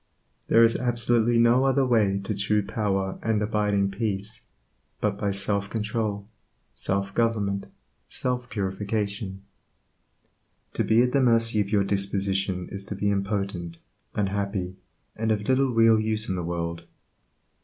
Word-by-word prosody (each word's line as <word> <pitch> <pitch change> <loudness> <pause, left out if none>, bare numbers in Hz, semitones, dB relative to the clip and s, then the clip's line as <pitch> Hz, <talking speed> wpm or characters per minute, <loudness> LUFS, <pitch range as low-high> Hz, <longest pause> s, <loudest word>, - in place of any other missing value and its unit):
There 115 - +6
is 115 0 +4
absolutely 120 -1 +2
no 120 +2 +5
other 135 0 +3
way 105 -6 +2
to - - -2
true 105 0 +1
power 100 -2 -1
and 110 -2 +1
abiding 105 -2 +1
peace, 105 +1 -4 0.6
but - - 0
by 100 - 0
self 100 0 -1
control, 105 -2 -2 0.5
self 100 0 -1
government, 105 -4 0 0.4
self 125 -1 -3
purification. 100 0 -3 1.3
To - - 0
be 115 +2 +4
at 125 - +1
the 140 - +3
mercy 115 -3 +3
of 100 - -3
your 100 -1 +2
disposition 95 -2 -1
is 100 0 -7
to 100 - -5
be 100 +1 0
impotent, 100 -4 -2 0.4
unhappy, 100 -2 -2 0.4
and 110 0 -1
of 105 -1 -1
little 130 0 +3
real 115 -1 +5
use 110 0 +1
in 95 - -1
the 90 - -2
world. 85 0 -4
105 Hz, 140 wpm, -26 LUFS, 100-115 Hz, 1.3 s, There